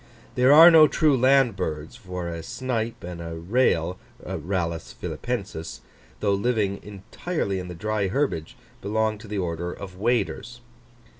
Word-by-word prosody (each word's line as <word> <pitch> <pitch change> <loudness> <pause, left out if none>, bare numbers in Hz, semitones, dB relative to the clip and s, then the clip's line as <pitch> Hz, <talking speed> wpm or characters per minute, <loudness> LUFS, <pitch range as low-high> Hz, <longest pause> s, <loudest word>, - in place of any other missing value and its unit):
There 125 +2 +4
are 165 +4 +10
no 160 -2 +8
true 150 -1 +3
land 130 -3 +4
birds, 80 -1 -4
for 90 -7 -6
a 85 -1 -5
snipe 120 +1 -3
and 85 -1 -7
a 85 0 -6
rail 90 -2 +1 0.3
(Rallus 85 -2 -3
Phillippensis), 95 -9 -5 0.4
though 100 -1 +2
living 100 -2 0
entirely 100 - -4
in 90 - -6
the 90 - -7
dry 105 +2 -1
herbage, 100 - -2 0.2
belong 110 +1 0
to 115 - -12
the 105 0 -4
order 85 -1 -3
of 95 -1 -9
Waders. 120 +1 -1
100 Hz, 145 wpm, -25 LUFS, 90-120 Hz, 0.4 s, are